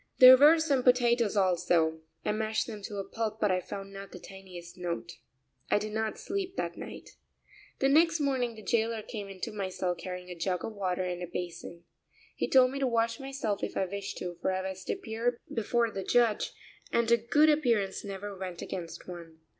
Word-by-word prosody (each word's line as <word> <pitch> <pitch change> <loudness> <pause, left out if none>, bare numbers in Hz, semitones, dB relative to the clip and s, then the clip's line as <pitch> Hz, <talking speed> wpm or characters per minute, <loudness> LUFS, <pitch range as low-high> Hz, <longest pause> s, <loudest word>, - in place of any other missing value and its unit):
There 255 0 +11
were 295 +5 +7
some 290 -5 +2
potatoes 240 -4 +3
also; 170 -4 +2 0.3
I - - +2
mashed 220 +1 0
them 215 -3 -7
to 205 - -6
a 195 - -4
pulp, 220 -1 -3
but 210 -3 +2
I 185 0 +1
found 195 +2 -7
not 195 0 -9
the - - -8
tiniest 180 -2 -11
note. 175 -2 -4 0.6
I - - +4
did 215 +1 -3
not 220 0 -1
sleep 390 -1 -3
that - - -2
night. - - -9 0.7
The 270 - +2
next 325 +3 +4
morning 260 -5 0
the 215 - -11
jailer 225 +1 0
came 205 -3 -6
into 195 +4 -5
my 200 -3 -3
cell 180 -1 -1
carrying 180 +1 -7
a - - -6
jug 180 +1 -2
of 225 - -5
water 185 -3 -1
and 180 -1 -3
a 175 - -4
basin. 175 0 -6 0.5
He - - -1
told 255 -1 +6
me 275 - -4
to 270 - +2
wash 230 -1 +1
myself 270 -7 -3
if - - -3
I 190 - +2
wished 200 +1 -5
to, 175 -1 -5
for - - +1
I 190 0 -2
was 190 -1 -6
to - - 0
appear 235 - -2 0.2
before 230 +1 +1
the 195 -2 -4
judge, 235 +1 +2 0.4
and 235 0 +2
a 235 - +7
good 290 +7 +4
appearance 230 -10 +1
never 200 0 -6
went 185 -2 -6
against 170 -3 -6
one. 165 -3 -10
210 Hz, 205 wpm, -30 LUFS, 185-240 Hz, 0.7 s, There